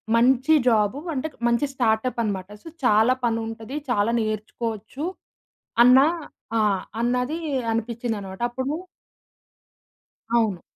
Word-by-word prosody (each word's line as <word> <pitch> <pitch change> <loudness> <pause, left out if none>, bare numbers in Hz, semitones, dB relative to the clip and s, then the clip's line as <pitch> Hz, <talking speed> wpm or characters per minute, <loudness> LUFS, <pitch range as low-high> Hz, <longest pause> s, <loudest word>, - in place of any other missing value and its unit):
మంచి 260 +6 +4
జాబ్. 215 +3 +2 0.2
అంటే, 310 +5 -2 0.2
మంచి 235 +5 +2
స్టార్టప్ 235 0 +1
అన్నమాట. 195 -2 -3
సో - - -11 0.2
చాలా 225 +3 +5
పని 230 -1 +1
ఉంటది, 225 +5 -6
చాలా 215 +1 +2
నేర్చుకోవచ్చు 220 +5 -4 0.8
అన్న 250 +2 +8 0.6
ఆహ్, 205 -3 +2 0.2
అన్నాది 250 +6 0 0.3
అనిపించింది 230 0 -2
అన్నమాట. 190 +2 -9
అప్పుడు 260 +4 -3 1.6
అవును. 215 -7 +2
230 Hz, 105 wpm, -24 LUFS, 215-255 Hz, 1.6 s, అన్న